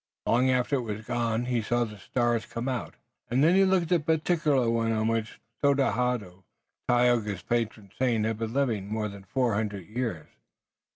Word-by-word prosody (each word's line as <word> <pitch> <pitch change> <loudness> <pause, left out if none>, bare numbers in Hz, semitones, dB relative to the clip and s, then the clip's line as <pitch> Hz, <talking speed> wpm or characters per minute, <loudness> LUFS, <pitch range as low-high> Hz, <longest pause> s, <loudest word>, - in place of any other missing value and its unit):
Long 125 +3 +3
after 130 +2 +2
it - - -1
was 110 -1 -5
gone 120 -1 -1
he 120 -2 0
saw 120 +3 +1
the 105 -3 -7
stars 120 0 0
come 115 +2 -4
out 125 -4 -3 0.3
and 130 +4 +2
then 165 +3 +5
he 195 +1 +5
looked 185 -3 +2
at 165 -4 +2
the 160 0 +4
particular 150 -6 +1
one 115 0 +1
on 110 0 +1
which 115 -1 -2 0.2
Tododaho, 125 -9 +1 0.4
Tayoga's 120 -5 +2
patron 110 -4 -2
saint, 120 -4 +2
had 110 -1 -2
been 115 -1 -3
living 115 -7 0
more 110 -1 -1
than 100 -1 -11
four 125 +3 0
hundred 100 -3 -2
years. 110 -8 -3
120 Hz, 180 wpm, -27 LUFS, 110-130 Hz, 0.4 s, then